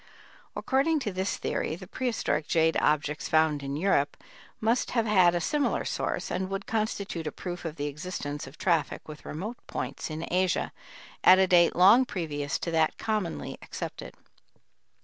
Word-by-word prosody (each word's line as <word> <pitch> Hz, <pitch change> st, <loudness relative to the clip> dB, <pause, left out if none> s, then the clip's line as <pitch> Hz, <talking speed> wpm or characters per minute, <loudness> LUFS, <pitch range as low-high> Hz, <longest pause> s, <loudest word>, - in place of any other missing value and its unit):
According 285 Hz, +4 st, +1 dB
to 210 Hz, -6 st, -3 dB
this 190 Hz, +1 st, -1 dB
theory -, -, -2 dB
the -, -, -10 dB
prehistoric 225 Hz, -11 st, -1 dB
jade 160 Hz, -1 st, +3 dB
objects 150 Hz, 0 st, 0 dB
found 155 Hz, -2 st, +3 dB
in 140 Hz, 0 st, -4 dB
Europe 145 Hz, -4 st, +1 dB, 0.4 s
must 230 Hz, +3 st, +1 dB
have 230 Hz, -, +3 dB
had 185 Hz, -5 st, +5 dB
a -, -, +1 dB
similar 285 Hz, -, 0 dB
source, -, -, -2 dB
and 185 Hz, +1 st, -2 dB
would 195 Hz, +1 st, -4 dB
constitute 200 Hz, -6 st, -2 dB
a -, -, -2 dB
proof 175 Hz, -1 st, -6 dB
of 160 Hz, -2 st, -4 dB
the 145 Hz, -, -3 dB
existence 145 Hz, -1 st, -5 dB
of 135 Hz, -, -13 dB
traffic 165 Hz, -6 st, 0 dB
with 150 Hz, -1 st, -10 dB
remote 210 Hz, +10 st, -5 dB
points 135 Hz, +2 st, -4 dB
in 160 Hz, +1 st, -4 dB
Asia 185 Hz, 0 st, +1 dB, 0.5 s
at 185 Hz, -, +8 dB
a 190 Hz, -, +5 dB
date 175 Hz, -2 st, +4 dB
long 205 Hz, +9 st, +7 dB
previous 145 Hz, -, -3 dB
to 170 Hz, -, -4 dB
that 160 Hz, -1 st, +2 dB
commonly 215 Hz, -6 st, -3 dB
accepted. -, -, -7 dB
175 Hz, 165 wpm, -28 LUFS, 150-200 Hz, 0.5 s, at